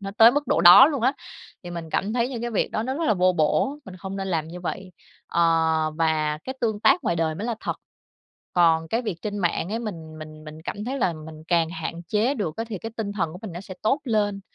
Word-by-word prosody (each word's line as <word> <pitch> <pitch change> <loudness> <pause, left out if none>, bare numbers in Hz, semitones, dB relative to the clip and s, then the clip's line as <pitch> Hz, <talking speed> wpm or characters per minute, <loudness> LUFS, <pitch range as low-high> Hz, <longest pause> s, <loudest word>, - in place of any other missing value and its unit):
nó 195 0 -5
tới 225 +1 +9
mức 290 +1 -1
độ - - +2
đó 175 - +10
luôn 280 -6 -3
á. 260 +3 +3 0.5
Thì 175 - -7
mình 165 -2 -6
cảm 200 +3 -1
thấy 240 0 +1
những 245 -3 -5
cái 240 - -2
việc 220 - 0
đó 215 - -1
nó 260 +3 -2
rất 325 +3 -2
là 215 - +3
vô 185 0 +3
bổ, 180 - +1
mình 190 -2 -10
không 190 +2 -6
nên 195 0 -3
làm 160 -3 -1
như 175 +2 -8
vậy. 185 +1 -5 0.3
Ờ, 170 - -1 0.6
và 155 -2 +1
cái 260 - -5
tương 220 -3 -1
tác 180 - +4
ngoài 170 - +1
đời 160 -1 0
mới 205 +8 -5
là 235 - -1
thật, - - -3 0.8
còn 165 -2 +3
cái 230 +6 0
việc 215 -7 -3
trên 205 -1 -3
mạng 175 -2 0
ấy 225 - -1
mình 165 -9 -7
mình 155 0 -10
mình 155 +1 -10
cảm 205 +5 -5
thấy 265 +4 -3
là 185 -8 +1
mình 155 0 -10
càng 170 -2 +2
hạn 165 +1 -5
chế 220 +6 +1
được 185 - -3
á, 225 - -2
thì 210 -4 -4
cái 225 +5 -7
tinh 210 -3 -3
thần 165 -6 -2
của 180 - -9
mình 215 -5 -6
nó 175 - -6
sẽ 190 -1 -9
tốt 270 +8 +2
lên. 205 -5 0
190 Hz, 265 wpm, -24 LUFS, 165-225 Hz, 0.8 s, đó